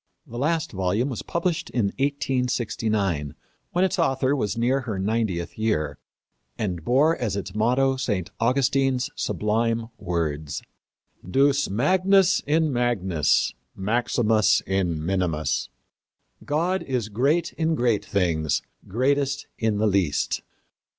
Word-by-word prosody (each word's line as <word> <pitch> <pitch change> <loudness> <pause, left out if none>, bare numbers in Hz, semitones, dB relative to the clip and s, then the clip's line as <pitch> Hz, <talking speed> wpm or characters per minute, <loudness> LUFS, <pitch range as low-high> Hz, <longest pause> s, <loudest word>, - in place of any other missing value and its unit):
The 120 - -7
last 160 +3 0
volume 100 +7 0
was 125 - -4
published 170 -1 -2
in 105 -5 0
1869, 115 - -1 0.3
when 180 +2 +2
its 185 - -1
author 135 -3 +2
was 105 -6 -2
near 125 +4 +2
her 115 -6 -4
ninetieth 100 -3 -1
year, 75 -10 0 0.6
and 90 -6 -3
bore 145 - +3
as 115 - -2
its 95 -2 -5
motto 125 +5 +2
St. 105 -9 -2
Augustine's 130 +1 +1
sublime 115 +2 0
words: 80 -5 -2 0.7
Deus 140 +5 +3
magnus 185 - +3
in 155 -1 +2
magnis, 95 - +1 0.2
maximus 110 +1 +2
in 90 -5 -1
minimis 90 -4 0 0.7
God 175 +6 0
is 125 -5 -2
great 135 +11 +1
in 160 0 0
great 120 -6 +1
things, 85 -6 0 0.2
greatest 140 +6 0
in 110 -2 +1
the 110 - +1
least. 95 -8 +1
115 Hz, 115 wpm, -24 LUFS, 95-135 Hz, 0.7 s, bore